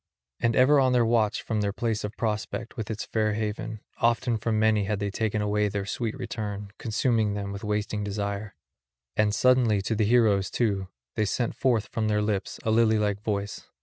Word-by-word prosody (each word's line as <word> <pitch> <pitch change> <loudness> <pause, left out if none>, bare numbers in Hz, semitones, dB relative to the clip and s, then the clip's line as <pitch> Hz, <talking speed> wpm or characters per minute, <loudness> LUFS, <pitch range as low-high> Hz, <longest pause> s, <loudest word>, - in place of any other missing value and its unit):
And 115 -1 +1
ever 140 +3 +6
on 130 -1 +3
the 120 -2 +4
watch 115 -2 +1
from 110 -2 -1
their 100 -1 0
place 115 0 -1
of 105 +1 -5
prospect 115 +2 -3
with 110 -5 -5
its 110 -1 -3
fair 110 -1 0
haven, 110 0 -3 0.2
often 120 +1 +2
from 110 +1 0
many 110 -1 +3
had 105 +1 -1
they 100 0 -2
taken 110 0 -1
away 105 0 +1
their 100 -1 -3
sweet 115 +3 -3
return, 105 -5 -5
consuming 110 -2 +1
them 100 -1 -4
with 100 +1 -7
wasting 105 0 -1
desire; 100 0 -3 0.6
and 105 -1 +3
suddenly 120 -2 +3
to 110 - -1
the 110 -1 +1
heroes, 105 -4 +3
too, 100 -5 0 0.3
they 110 - +1
sent 120 +3 -1
forth 120 -5 +1
from 110 -1 -1
their 105 0 +1
lips 105 -2 -2
a 110 - +1
lily 110 0 +4
like 105 -1 0
voice. 100 -2 -3
110 Hz, 195 wpm, -27 LUFS, 105-115 Hz, 0.6 s, ever